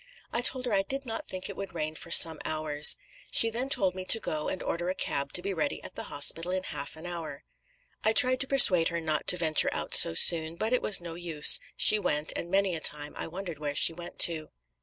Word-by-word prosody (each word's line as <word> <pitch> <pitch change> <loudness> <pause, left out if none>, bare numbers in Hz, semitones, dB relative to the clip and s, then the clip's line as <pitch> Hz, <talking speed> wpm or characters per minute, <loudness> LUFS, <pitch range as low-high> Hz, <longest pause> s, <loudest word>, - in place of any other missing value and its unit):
I 235 - -2
told 255 0 +2
her 240 - -3
I 195 - +1
did 270 +7 -6
not 225 -2 -7
think 185 0 -7
it 200 - -8
would 195 -2 -9
rain 155 -1 -5
for 165 - -9
some 165 -2 +7
hours. 150 -1 +1 0.3
She 230 - +3
then 250 +4 -5
told 190 -8 +1
me 185 0 -8
to 225 - +5
go 155 -7 -5
and 185 - -7
order 175 +1 -4
a 185 - -4
cab 140 0 -4
to 180 - 0
be 195 0 -4
ready 155 -5 -4
at - - -10
the - - -8
hospital 165 +4 +1
in 185 0 -4
half 145 - -8
an 160 +2 -12
hour. 165 -5 -8 0.6
I 220 - +1
tried 255 +3 +3
to 270 - +1
persuade 190 -12 +5
her 170 - -4
not 155 -2 -4
to 180 - +3
venture 160 -3 +1
out - - -6
so 80 - +5
soon; 160 - +4
but 220 +7 -4
it 250 - 0
was 205 - +2
no 170 -1 -9
use 165 -3 +3 0.2
she 215 - +3
went; 150 -5 -2
and 170 - -6
many 195 -1 -1
a - - -6
time 150 -1 -3
I - - -7
wondered 175 -2 -9
where 145 -1 -6
she 165 - +2
went 175 +1 -11
to. 160 -2 +2
175 Hz, 245 wpm, -26 LUFS, 155-195 Hz, 0.6 s, some